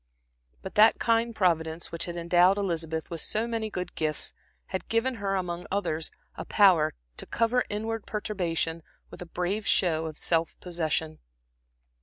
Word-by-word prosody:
But - - -6
that 215 +2 +6
kind 230 0 +1
Providence 165 -4 0
which 170 - -3
had 175 - -5
endowed 175 +3 +4
Elizabeth 165 -5 -2
with 165 -2 -1
so 220 +2 0
many 225 -2 -2
good 180 -3 -5
gifts 155 -1 -1 0.3
had - - -5
given 230 +3 +2
her 195 -1 0
among 180 -2 -3
others 165 -5 -1 0.3
a - - -5
power 180 -7 +4 0.2
to - - -5
cover 235 +2 +2
inward 220 +1 -3
perturbation 170 -6 -2 0.3
with - - -10
a 180 - -7
brave 180 +5 -2
show 160 -3 +2
of 155 -1 -7
self 165 -1 0
possession. 160 -2 -2
180 Hz, 155 wpm, -28 LUFS, 165-210 Hz, 0.3 s, that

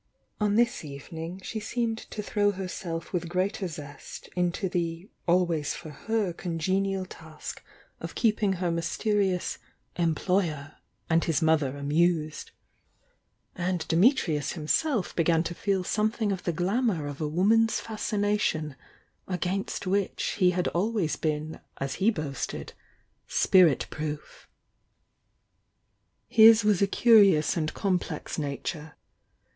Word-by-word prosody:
On 210 -1 +2
this 235 -2 +2
eve 140 +2 -9
ning 165 +3 -6
she 220 - -4
seemed 225 +1 -2
to 210 - -5
throw 205 0 +1
herself 180 -3 -5
with 175 -1 -2
greater 185 +2 -1
zest 145 -4 -9
into 180 +2 0
the 170 0 -3 0.2
always 170 -4 +2
for 155 - -9
her 210 +4 -1
congenial 190 +3 -1
task 160 -4 -9 0.4
of - - -7
keeping 210 -4 +2
m 180 - -8 0.2
186 170 -1 -3
THE 220 - 0
YOUNG 210 - +3
DIANA 200 - +4
•:« - - +1
her 185 - +1
mystenous - - -4 0.4
"employer" 165 -2 0 0.3
and 165 0 +3
his 165 -1 +1
mother 150 -4 +2
amused, 155 +2 0 1.1
—and 180 -2 -2
Dimitrius 170 - +2
himself 190 - 0
began 165 -1 +3
to 175 - -4
feel 190 +1 0
something 215 +2 0
of 190 -2 -4
the 175 - +1
glamour 185 - 0
of 145 +1 -6
a 155 - 0
woman's 215 +8 +3
fascination 205 -8 -1 0.5
against 185 +3 -2
which 195 +1 0 0.2
he 185 -2 +5
had 180 0 0
always 195 -2 0
been 155 0 -3 0.2
as 135 -1 -2
he 205 - +5
boasted— 155 - -4 0.5
"spirit 175 -8 +4
proof." 150 -1 -6 1.8
His 225 0 +7
was 210 -3 +3
a 200 - +4
curious 200 -8 +5
and 155 -3 -1
complex 185 -3 -2
nature. 150 +1 -4
180 Hz, 135 wpm, -27 LUFS, 160-205 Hz, 1.8 s, His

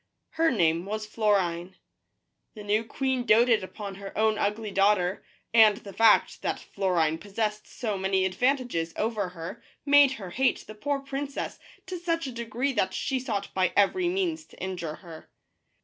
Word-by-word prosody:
Her 325 0 +2
name 170 - +1
was 215 +1 -3
Florine. 190 -5 0 0.8
The 210 - -9
new 210 +2 +1
queen 260 +2 -1
doted 230 -1 +4
upon 200 +1 -7
her 195 0 -8
own 220 0 +2
ugly 210 +1 -1
daughter, 195 -2 +2 0.3
and 220 -3 +7
the 200 -1 -10
fact 225 +1 +4
that - - -2
Florine 170 -5 0
possessed 210 +1 -3
so 215 -5 -4
many 190 0 +1
advantages 215 -5 0
over 215 -4 -1
her 175 +1 -8 0.2
made 285 -1 +6
her 195 -8 -8
hate 260 +7 +1
the 215 - -9
poor 275 +6 -2
princess 275 +1 -5 0.3
to 370 -2 -5
such 335 -2 -1
a 265 - -4
degree 235 +3 -2
that 190 -5 0
she 265 -1 -1
sought 215 -6 -4
by 185 -2 +1
every 345 - +3
means 350 -4 -1
to - - -18
injure 175 -4 -4
her. 165 -2 -11
215 Hz, 165 wpm, -27 LUFS, 190-260 Hz, 0.8 s, and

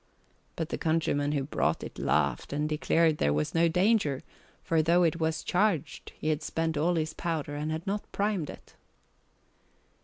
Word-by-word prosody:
But 165 -1 -3
the - - -3
countryman 150 -3 +1
who 140 -2 0
brought 135 - 0
it - - -8
laughed - - 0
and 150 +1 0
declared 155 +1 +2
there 75 - +2
was 75 +1 -1
no 170 +1 +4
danger, 180 - +2 0.4
for 165 -1 +2
though 170 +3 +4
it 165 0 +1
was 160 0 -1
charged 185 -5 0
he 155 - -2
had 155 0 0
spent 160 +1 -2
all 165 +4 +2
his 160 -1 -1
powder 160 -4 -3
and 150 +1 -3
had 160 +2 -4
not 205 +1 -3
primed 200 -7 -1
it. - - -11
160 Hz, 175 wpm, -29 LUFS, 150-170 Hz, 0.4 s, no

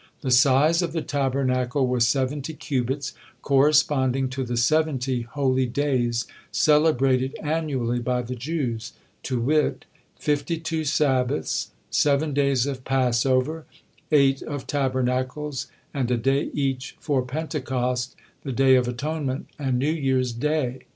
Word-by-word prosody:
The 130 - -2
size 140 +6 +5
of 170 -2 -2
the 165 -2 -2
Tabernacle 135 -1 0
was 125 -2 +2
seventy 135 +4 -1
cubits, 135 +1 -2 0.3
corresponding 135 -2 +3
to 130 +1 -3
the 120 -1 -3
seventy 135 -1 +1
holy 130 +1 0
days 120 -3 0 0.3
celebrated 135 -4 +3
annually 145 -6 -1
by 125 +1 -1
the 125 +2 -5
Jews, 125 -3 -3 0.3
to 125 -3 -2
wit: 150 +5 +1 0.3
fifty 150 +3 -1
two 160 -1 -3
Sabbaths, 130 - 0 0.2
seven 145 +1 +2
days 140 -3 +2
of 135 -3 -4
Passover, 130 +4 +1 0.4
eight 135 -2 +4
of 145 -2 -5
Tabernacles, 130 0 -1 0.3
and 130 -4 -1
a 125 - +2
day 135 +5 +1
each 135 -2 -2
for 145 -4 0
Pentecost, 125 -3 -2 0.3
the 135 - -5
Day 130 +1 +4
of 125 -1 +4
Atonement, 140 +2 -3
and 130 -3 0
New 140 +5 +1
Year's 130 -5 0
Day. 130 0 -1
135 Hz, 130 wpm, -24 LUFS, 125-150 Hz, 0.4 s, size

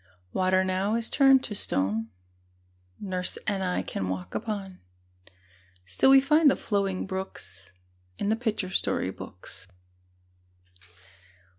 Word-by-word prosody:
Water 185 0 +2
now 190 +3 0
is 230 0 0
turned 270 -2 +5
to 210 - -4
stone 110 - 0 0.9
Nurse 185 -2 -3
and 200 -3 -1
I 180 -1 -1
can 95 -1 -4
walk 95 -1 -5
upon; 200 -4 -4 1.1
Still 95 - +2
we 270 0 +9
find 300 +3 +5
the - - +2
flowing 195 -3 -1
brooks 190 - -6 0.5
In 200 - -1
the 220 - +3
picture 220 -5 -2
story 95 - 0
books. 90 0 -11
190 Hz, 120 wpm, -27 LUFS, 180-220 Hz, 1.1 s, we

